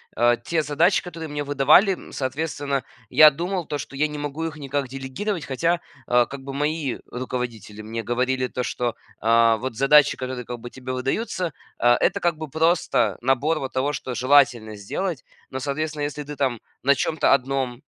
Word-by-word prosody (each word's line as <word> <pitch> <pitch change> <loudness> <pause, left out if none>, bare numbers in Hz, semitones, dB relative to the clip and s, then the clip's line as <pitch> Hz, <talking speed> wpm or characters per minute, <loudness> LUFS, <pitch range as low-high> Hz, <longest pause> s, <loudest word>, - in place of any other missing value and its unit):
э, 120 0 +4
те 165 -1 +1
задачи, 155 +6 +2
которые 165 -2 -7
мне 145 0 -3
выдавали, 145 +8 +5
м, - - -10
соответственно, 140 0 -2 0.3
я 155 -1 +8
думал 175 +4 -3
то, 150 - -3
что 140 - -8
я 150 +3 +2
не 150 0 -7
могу 145 +2 -4
их 160 -1 -4
никак 140 -1 -2
делегировать. 135 +8 -4
Хотя, 165 +6 0 0.3
а, 120 0 +4
как 140 +1 -8
бы, 135 0 -6
мои 150 -2 -1
руководители 120 -4 -5
мне 115 +1 -5
говорили 130 +1 0
то, 125 0 -3
что, 120 -1 -2 0.2
а, 115 0 +4
вот, 130 +1 -5
задачи, 140 +4 +5
которые 130 -2 -5
как 120 -1 -6
бы 120 - -8
тебе 130 0 -6
выдаются, 160 - -2 0.3
а, 120 0 +5
это, - - +2
как 170 -2 0
бы, 155 -1 -6
просто 160 - +2
набор, 135 +5 +1
вот, 135 -1 -5
того, 135 +3 0
что 130 - -4
желательно 125 -3 +3
сделать, 145 - -4 0.3
но, 130 - -4
соответственно, 150 +2 -3
если 145 0 -3
ты, 150 +1 -8
там, 130 -5 -1 0.2
на 140 +2 +5
чем-то 155 +3 +2
1, 135 -1 -1
135 Hz, 185 wpm, -23 LUFS, 125-155 Hz, 0.3 s, я